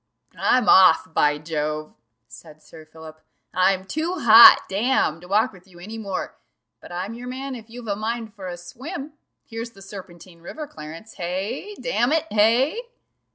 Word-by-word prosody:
"I'm 250 0 +2
off, 175 -3 +5
by 150 -1 +2
Jove!" 155 0 -4 0.3
said 150 +7 -15
Sir 160 -1 -14
Philip. 155 0 -13 0.3
"I'm 185 +1 +2
too 315 - -3
hot, 230 -7 +9
damme, 195 -6 0
to 180 - -13
walk 215 +3 +1
with 185 0 -18
you 180 -2 -18
any 215 +6 -8
more 200 -3 -5 0.4
but - - -14
I'm 185 +5 -5
your 245 +2 -9
man 265 +2 -5
if 230 -3 -10
you've 240 +1 -10
a 200 - -1
mind 220 +1 -4
for 195 -4 -9
a 175 -1 -6
swim 275 - -8 0.3
here's 230 0 -6
the 195 - -16
Serpentine 185 -3 -12
river, 300 - -8
Clarence 165 - -11
hey? 200 - -4
damn 250 0 0
it! 320 0 +1
hey?" 240 - +2
200 Hz, 165 wpm, -23 LUFS, 175-240 Hz, 0.4 s, hot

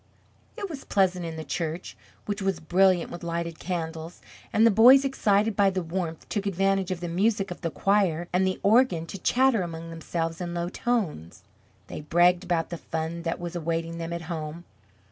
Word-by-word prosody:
It 410 -3 -3
was 305 -7 -8
pleasant 185 -3 +1
in 165 - -6
the 160 - -5
church 165 +1 -4 0.3
which 205 0 -3
was 190 -3 0
brilliant 180 +2 +2
with 175 - -7
lighted 170 -1 -3
candles; 165 -2 -5 0.3
and 220 - +4
the 230 - +6
boys 250 +6 +7
excited 215 -5 +2
by 200 -1 +4
the 185 -1 -2
warmth 165 -1 -4
took 205 -1 -2
advantage 195 0 +1
of 185 -2 -3
the 175 - -3
music 195 +3 0
of 180 - -7
the 170 - -1
choir 180 -2 +1
and 185 +1 +3
the 185 - -2
organ 210 -6 +4
to 195 - -8
chatter 255 0 +3
among 165 -1 -6
themselves 165 +1 -3
in 175 -1 -4
low 170 0 -2
tones. 190 - -2 0.4
They - - -7
bragged 175 +4 +3
about 175 -2 -1
the 170 - -5
fun 160 +1 -4
that 165 0 -3
was 175 0 -6
awaiting 165 0 -2
them 165 0 -4
at 170 -1 -4
home. 160 0 -5
175 Hz, 190 wpm, -26 LUFS, 165-195 Hz, 0.4 s, boys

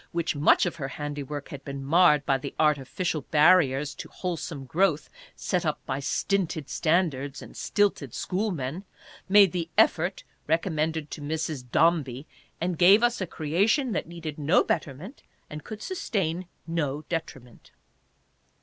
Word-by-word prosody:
which 170 -1 -1
much 145 +5 +4
of 175 - -3
her 135 -4 -4
handiwork 145 0 -6
had 140 -1 -8
been 140 -1 -6
marred 150 -1 +4
by 135 - +2
the 135 +1 -5
artificial 150 +2 0
barriers 150 -3 +4
to - - -9
wholesome 165 -5 -5
growth 160 0 +1 0.2
set - - -1
up - - -1
by 130 - -2
stinted 160 0 -1
standards 155 -5 0
and - - -12
stilted 200 - 0
schoolmen, 180 - -3 0.5
made 200 -2 +7
the 170 -1 -3
"effort" 175 +4 +2 0.2
recommended 160 -2 -1
to 155 - -6
Mrs. 155 -2 -3
Dombey, 155 -5 +2 0.3
and 175 -1 -2
gave 195 +6 +7
us 240 -3 +2
a 185 - -2
creation 200 - +1
that 185 - -2
needed 165 -3 -7
no 150 +5 +3
betterment 160 - -4 0.3
and 150 0 -7
could 215 -1 -8
sustain 185 - -2 0.2
no 155 -3 -2
detriment. 135 -7 -6
160 Hz, 140 wpm, -26 LUFS, 145-180 Hz, 0.5 s, made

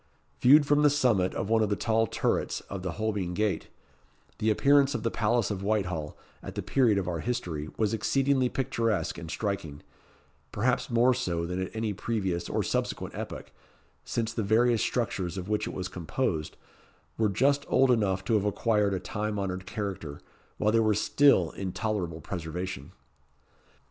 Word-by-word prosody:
Viewed 145 +4 +7
from 145 +1 +3
the 150 - +6
summit 120 -10 +2
of 95 - -2
one 115 -1 +4
of 105 - +1
the 105 - +1
tall 115 +1 +1
turrets - - -1
of 100 -2 -7
the 90 -2 -3
Holbein 100 -4 -2
Gate, 105 -1 0 0.7
the 110 - +1
appearance 140 +5 +4
of 115 - -3
the 115 - 0
palace 115 0 +1
of 100 -2 -3
Whitehall, 90 -7 -1 0.2
at - - -8
the - - -3
period 120 -7 +3
of 95 -2 -1
our 85 -2 -2
history, 80 -9 -3
was 110 -1 +1
exceedingly 130 +4 +2
picturesque 115 -11 -1
and 80 -1 -8
striking 85 -6 -4 0.7
perhaps 125 +6 0
more 120 +2 +4
so 85 -9 -2
than 90 +2 -3
at 95 - -5
any 110 -1 -1
previous 95 -4 -2
or - - 0
subsequent - - -2
epoch, - - -7 0.5
since 115 -1 -2
the 115 - -1
various 115 +3 +3
structures 100 -7 -1
of 95 +1 -5
which 105 -1 0
it - - -5
was 95 0 -3
composed 90 - -3 0.6
were 110 -2 +1
just 140 +8 +2
old 135 -1 +4
enough 95 -5 +1
to 115 - 0
have 105 -2 +2
acquired 105 -1 +1
a - - -2
time 105 +3 -3
honoured 95 -1 -3
character, 95 -9 -5 0.4
while 105 - +2
they 115 - +3
were 110 -2 +3
still 105 - +4
in 95 -2 -4
tolerable 90 -7 -3
preservation. 90 -2 -5
105 Hz, 175 wpm, -28 LUFS, 95-115 Hz, 0.7 s, Viewed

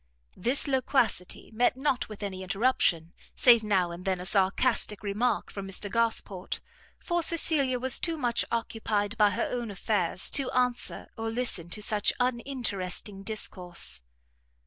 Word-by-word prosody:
This 245 +9 +3
loquacity 260 -9 0
met 245 +3 +2
not 265 -3 0
with 210 -1 -8
any 190 -2 -4
interruption, 185 -5 +1 0.2
save 235 -3 +6
now 190 -5 +1
and 170 +1 -8
then 190 -1 0
a 180 - -6
sarcastic 200 +2 +1
remark, 210 +5 0
from 195 -1 -6
Mr 195 +1 0
Gosport; 225 -5 -1 0.4
for 345 0 -1
Cecilia 305 -6 +2
was 260 +1 +2
too 330 -2 -1
much 240 -5 +1
occupied 220 -2 -1
by 210 -1 +6
her 195 - -1
own 240 -2 -3
affairs, 190 -3 0
to 275 -2 +1
answer 250 -1 0
or 225 0 -2
listen 225 -8 -2
to 210 +4 -2
such 210 -1 +2
uninteresting 235 -6 -2
discourse. 180 - -1
220 Hz, 145 wpm, -28 LUFS, 195-250 Hz, 0.4 s, save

